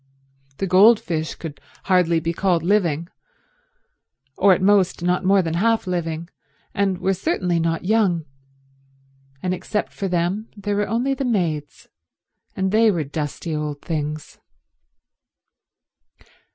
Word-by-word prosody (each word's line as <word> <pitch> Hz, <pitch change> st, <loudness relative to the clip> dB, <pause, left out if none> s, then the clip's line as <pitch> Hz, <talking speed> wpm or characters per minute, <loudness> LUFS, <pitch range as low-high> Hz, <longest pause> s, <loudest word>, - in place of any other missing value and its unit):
The -, -, -1 dB
goldfish 185 Hz, -4 st, +3 dB
could 155 Hz, -3 st, -8 dB, 0.2 s
hardly 180 Hz, -3 st, +3 dB
be 165 Hz, +1 st, -2 dB
called 175 Hz, -2 st, +1 dB
living, 170 Hz, -4 st, +1 dB, 1.3 s
or 200 Hz, -, +4 dB
at 180 Hz, -, +4 dB
most 190 Hz, -2 st, +2 dB
not 180 Hz, +1 st, +1 dB
more 195 Hz, 0 st, +4 dB
than 165 Hz, -1 st, -2 dB
half 225 Hz, +6 st, +1 dB
living, 170 Hz, -2 st, -3 dB, 0.5 s
and 195 Hz, -2 st, 0 dB
were 190 Hz, +1 st, 0 dB
certainly 180 Hz, -, -1 dB
not 165 Hz, +1 st, -1 dB
young, 190 Hz, -6 st, +2 dB, 1.2 s
and 185 Hz, 0 st, 0 dB
except 210 Hz, +3 st, -3 dB
for 195 Hz, -, -3 dB
them 180 Hz, +5 st, -1 dB
there 205 Hz, 0 st, -2 dB
were 205 Hz, 0 st, 0 dB
only 240 Hz, +6 st, 0 dB
the 270 Hz, -, -3 dB
maids, 170 Hz, -, -2 dB, 0.7 s
and 190 Hz, 0 st, -1 dB
they 220 Hz, +1 st, +5 dB
were 170 Hz, -6 st, 0 dB
dusty 150 Hz, +2 st, -4 dB
old 150 Hz, -1 st, -4 dB
things. 150 Hz, -1 st, -4 dB
180 Hz, 125 wpm, -22 LUFS, 165-200 Hz, 1.3 s, they